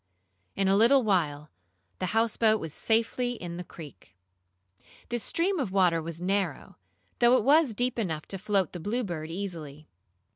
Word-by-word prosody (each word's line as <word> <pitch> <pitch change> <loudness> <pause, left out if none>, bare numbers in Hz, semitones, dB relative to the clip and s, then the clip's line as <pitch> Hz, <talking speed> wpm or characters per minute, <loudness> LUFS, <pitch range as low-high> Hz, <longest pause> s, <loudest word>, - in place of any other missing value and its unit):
In 195 -1 +1
a 195 - +4
little 240 +6 +5
while 155 -8 0 0.5
the 185 - -1
houseboat 225 +1 +2
was 160 -4 -6
safely 230 +4 0
in 175 -6 -7
the 180 - -5
creek. 150 - -13 0.9
This 240 -1 -2
stream 365 - 0
of 250 -9 -2
water 180 -4 +3
was 165 0 -6
narrow, 195 +2 -2 0.4
though 240 +1 +5
it - - 0
was 285 -2 +4
deep 245 +1 -1
enough 160 -8 -2
to 195 - -3
float 195 -2 0
the 175 - -7
Bluebird 175 -5 -3
easily. 165 -5 -6
195 Hz, 155 wpm, -28 LUFS, 170-230 Hz, 0.9 s, little